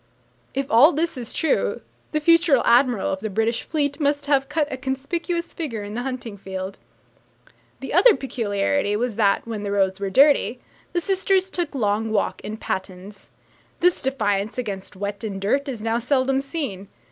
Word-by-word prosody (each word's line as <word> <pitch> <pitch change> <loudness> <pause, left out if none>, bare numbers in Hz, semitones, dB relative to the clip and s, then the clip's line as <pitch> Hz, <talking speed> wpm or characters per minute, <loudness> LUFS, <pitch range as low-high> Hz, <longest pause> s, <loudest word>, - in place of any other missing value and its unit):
If 275 0 0
all 260 +9 +7
this 325 +2 -1
is 245 -3 -6
true, 320 - 0 0.3
the 305 - +1
future 335 -3 +5
admiral 245 -3 +3
of 190 - -2
the 215 +2 -4
British 225 +3 0
Fleet 290 -2 -2
must 285 -1 +1
have 275 -1 +2
cut 300 -1 0
a - - -1
conspicuous 285 +7 -3
figure 235 -11 -4
in 205 0 -7
the 240 - -3
hunting 245 -5 -5
field. 190 0 -6 1.0
The - - -5
other - - +7
peculiarity 210 -1 -1
was 235 0 -1
that, 200 -3 +2
when 225 -3 -5
the 205 - -3
roads 195 -1 +1
were 200 -1 -2
dirty, 270 +1 +4 0.3
the 350 - 0
sisters 385 +1 +1
took 345 -6 -3
long 220 -2 0
walks 215 -2 -1
in 215 +1 -5
pattens. 190 0 -6 0.5
This 355 0 +3
defence 215 -6 -1
against 200 -7 -5
wet 200 +2 -5
and 200 -3 -4
dirt 275 +9 0
is 230 -5 -5
now 225 +1 +1
seldom 265 +2 +1
seen. 275 - -5
245 Hz, 170 wpm, -23 LUFS, 205-285 Hz, 1.0 s, all